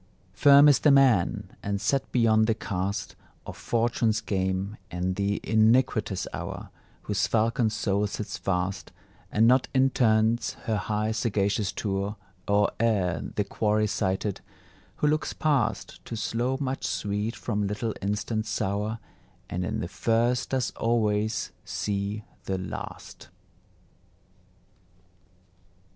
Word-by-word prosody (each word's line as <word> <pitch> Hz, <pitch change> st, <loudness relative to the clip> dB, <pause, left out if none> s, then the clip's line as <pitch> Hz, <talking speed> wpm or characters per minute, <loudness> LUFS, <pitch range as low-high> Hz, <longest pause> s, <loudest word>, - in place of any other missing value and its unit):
Firm 140 Hz, +1 st, +7 dB
is 145 Hz, -, +6 dB
the 150 Hz, -, +4 dB
man, 135 Hz, -10 st, +3 dB
and 100 Hz, 0 st, -2 dB
set 135 Hz, +5 st, 0 dB
beyond 110 Hz, -2 st, +3 dB
the 110 Hz, -, +2 dB
cast 100 Hz, -2 st, -3 dB, 0.3 s
Of -, -, -7 dB
Fortune's 115 Hz, -2 st, 0 dB
game, 95 Hz, +1 st, -2 dB
and 90 Hz, +1 st, -2 dB
the 100 Hz, +1 st, 0 dB
iniquitous 110 Hz, -2 st, +2 dB
hour, -, -, -6 dB, 0.3 s
Whose 105 Hz, -1 st, 0 dB
falcon 115 Hz, +1 st, +2 dB
soul 105 Hz, -2 st, 0 dB
sits 105 Hz, +1 st, -5 dB
fast, 95 Hz, -2 st, -2 dB, 0.4 s
And 110 Hz, +2 st, +4 dB
not 130 Hz, +2 st, +4 dB
intends 115 Hz, -3 st, +3 dB
her 110 Hz, -3 st, 0 dB
high 105 Hz, +1 st, -1 dB
sagacious 105 Hz, -3 st, 0 dB
tour 100 Hz, 0 st, -2 dB, 0.3 s
Or 100 Hz, 0 st, +3 dB
ere 100 Hz, -7 st, +1 dB
the 105 Hz, -, +1 dB
quarry 105 Hz, +1 st, +1 dB
sighted; 95 Hz, -1 st, -1 dB, 0.5 s
who 150 Hz, -, 0 dB
looks 155 Hz, +1 st, 0 dB
past 135 Hz, -8 st, -1 dB
To 115 Hz, -, -5 dB
slow 120 Hz, +4 st, -1 dB
much 135 Hz, -1 st, -3 dB
sweet 105 Hz, +2 st, -2 dB
from 105 Hz, -3 st, -2 dB
little 105 Hz, +2 st, -2 dB
instant 105 Hz, +2 st, -2 dB
sour, 105 Hz, +2 st, -1 dB, 0.5 s
And 90 Hz, +1 st, -2 dB
in -, -, -2 dB
the -, -, -3 dB
first 115 Hz, +6 st, +1 dB
does 130 Hz, -2 st, 0 dB
always 110 Hz, -2 st, 0 dB
see 100 Hz, +1 st, -3 dB, 0.2 s
the 95 Hz, -, -1 dB
last. 95 Hz, -, -8 dB
110 Hz, 125 wpm, -27 LUFS, 100-115 Hz, 0.5 s, Firm